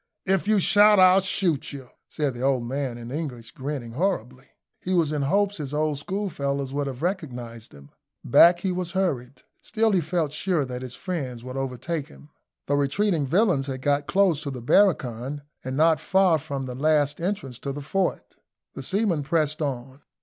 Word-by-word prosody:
"If 195 Hz, 0 st, +1 dB
you 215 Hz, 0 st, +4 dB
shout, 205 Hz, +1 st, +6 dB
I'll 185 Hz, +1 st, +7 dB
shoot 185 Hz, -5 st, 0 dB
you!" 135 Hz, -3 st, -9 dB, 0.2 s
said 145 Hz, -3 st, -1 dB
the 120 Hz, -, -8 dB
old 130 Hz, -2 st, +1 dB
man, 130 Hz, 0 st, -3 dB
in 120 Hz, 0 st, -8 dB
English, 130 Hz, -7 st, -5 dB
grinning 130 Hz, -3 st, -5 dB
horribly. 130 Hz, -, -2 dB, 0.3 s
He 185 Hz, +1 st, -1 dB
was 165 Hz, -4 st, +2 dB
in 150 Hz, -1 st, -1 dB
hopes 200 Hz, +8 st, +1 dB
his 150 Hz, -2 st, -5 dB
old 150 Hz, -2 st, 0 dB
schoolfellows 140 Hz, -7 st, -3 dB
would 145 Hz, 0 st, -1 dB
have 130 Hz, +1 st, -6 dB
recognised 125 Hz, -, -4 dB
him. 70 Hz, 0 st, -15 dB, 0.3 s
Back 175 Hz, +1 st, +6 dB
he 190 Hz, -, 0 dB
was 180 Hz, -1 st, -3 dB
hurried. 135 Hz, -9 st, -2 dB, 0.2 s
Still 225 Hz, -1 st, +1 dB
he 190 Hz, -3 st, +3 dB
felt 160 Hz, -2 st, -1 dB
sure 165 Hz, -2 st, 0 dB
that 125 Hz, -1 st, -6 dB
his 125 Hz, -1 st, -7 dB
friends 135 Hz, -10 st, -5 dB
would 130 Hz, +1 st, -7 dB
overtake 135 Hz, +4 st, -3 dB
him. 70 Hz, +2 st, -17 dB, 0.3 s
The 145 Hz, -, +1 dB
retreating 145 Hz, +2 st, +1 dB
villains 175 Hz, -, +2 dB
had 130 Hz, -1 st, -5 dB
got 145 Hz, 0 st, +1 dB
close 180 Hz, -2 st, +2 dB
to 150 Hz, -, -4 dB
the 130 Hz, -2 st, -6 dB
barracoon, 135 Hz, -, +1 dB, 0.2 s
and 130 Hz, +1 st, -4 dB
not 160 Hz, +1 st, +4 dB
far 190 Hz, -4 st, +3 dB
from 140 Hz, -3 st, -5 dB
the 125 Hz, -, -5 dB
last 150 Hz, +2 st, +1 dB
entrance 170 Hz, -, -3 dB
to 140 Hz, -, -4 dB
the 145 Hz, +2 st, -6 dB
fort. 190 Hz, +6 st, -2 dB, 0.4 s
The -, -, -7 dB
seamen 195 Hz, -6 st, 0 dB
pressed 155 Hz, +1 st, 0 dB
on. 135 Hz, -1 st, -4 dB
145 Hz, 185 wpm, -25 LUFS, 130-180 Hz, 0.4 s, I'll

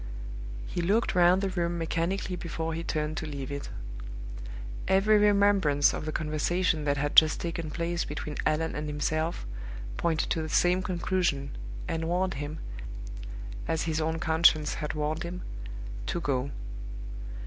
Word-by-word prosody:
He 175 Hz, -, -2 dB
looked 205 Hz, +7 st, +2 dB
round 180 Hz, +1 st, +6 dB
the 195 Hz, -, +2 dB
room 175 Hz, -2 st, 0 dB
mechanically 170 Hz, +3 st, -1 dB
before 165 Hz, -1 st, -3 dB
he 165 Hz, +1 st, -3 dB
turned 155 Hz, -1 st, -1 dB
to 160 Hz, -, -2 dB
leave 140 Hz, -2 st, -5 dB
it. 140 Hz, 0 st, -4 dB, 1.2 s
Every 195 Hz, +3 st, +5 dB
remembrance 200 Hz, -8 st, +5 dB
of -, -, -3 dB
the 155 Hz, -, -1 dB
conversation 155 Hz, +1 st, +1 dB
that 145 Hz, 0 st, +2 dB
had 145 Hz, +2 st, 0 dB
just 155 Hz, -1 st, +8 dB
taken 165 Hz, -2 st, -3 dB
place 170 Hz, +2 st, -1 dB
between 150 Hz, -, -4 dB
Allan 160 Hz, +1 st, +1 dB
and 150 Hz, 0 st, -2 dB
himself 155 Hz, -, -1 dB, 0.5 s
pointed 165 Hz, -2 st, +1 dB
to 165 Hz, -, +2 dB
the 155 Hz, -, -3 dB
same 180 Hz, +3 st, +4 dB
conclusion, 175 Hz, -6 st, 0 dB, 0.3 s
and 165 Hz, 0 st, -1 dB
warned 185 Hz, +2 st, +1 dB
him, 145 Hz, +2 st, -4 dB, 1.1 s
as 160 Hz, -, +1 dB
his 160 Hz, -1 st, 0 dB
own 160 Hz, +1 st, 0 dB
conscience 160 Hz, -2 st, +4 dB
had 150 Hz, -1 st, -3 dB
warned 155 Hz, +2 st, -1 dB
him, 180 Hz, +1 st, -4 dB, 0.6 s
to -, -, 0 dB
go. 140 Hz, -4 st, 0 dB
165 Hz, 150 wpm, -29 LUFS, 150-175 Hz, 1.2 s, just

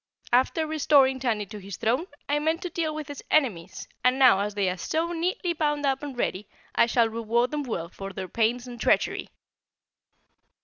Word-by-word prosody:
After 260 Hz, +6 st, +3 dB
restoring 280 Hz, -4 st, +3 dB
Tandy 225 Hz, -5 st, -1 dB
to 210 Hz, +1 st, -9 dB
his 195 Hz, -1 st, -8 dB
throne, 245 Hz, +10 st, 0 dB, 0.2 s
I 290 Hz, +1 st, +1 dB
meant 320 Hz, +3 st, 0 dB
to 360 Hz, -, -4 dB
deal 315 Hz, -2 st, -2 dB
with 305 Hz, -2 st, -5 dB
his 290 Hz, -, -8 dB
enemies, 230 Hz, -, 0 dB, 0.2 s
and 255 Hz, +1 st, +3 dB
now 255 Hz, -7 st, +6 dB
as 205 Hz, 0 st, -2 dB
they 200 Hz, -2 st, +1 dB
are 180 Hz, -, 0 dB
so 325 Hz, -, -1 dB
neatly 345 Hz, +1 st, -1 dB
bound 295 Hz, -2 st, 0 dB
up 270 Hz, -1 st, +1 dB
and 285 Hz, -4 st, -7 dB
ready, 200 Hz, -3 st, -2 dB, 0.3 s
I -, -, +4 dB
shall 235 Hz, -1 st, +3 dB
reward 230 Hz, +2 st, 0 dB
them 300 Hz, -1 st, -1 dB
well 220 Hz, -11 st, -4 dB
for 195 Hz, +1 st, -8 dB
their 190 Hz, 0 st, -6 dB
pains 235 Hz, +5 st, 0 dB
and 240 Hz, -2 st, -9 dB
treachery." -, -, +1 dB
255 Hz, 190 wpm, -26 LUFS, 220-300 Hz, 0.3 s, now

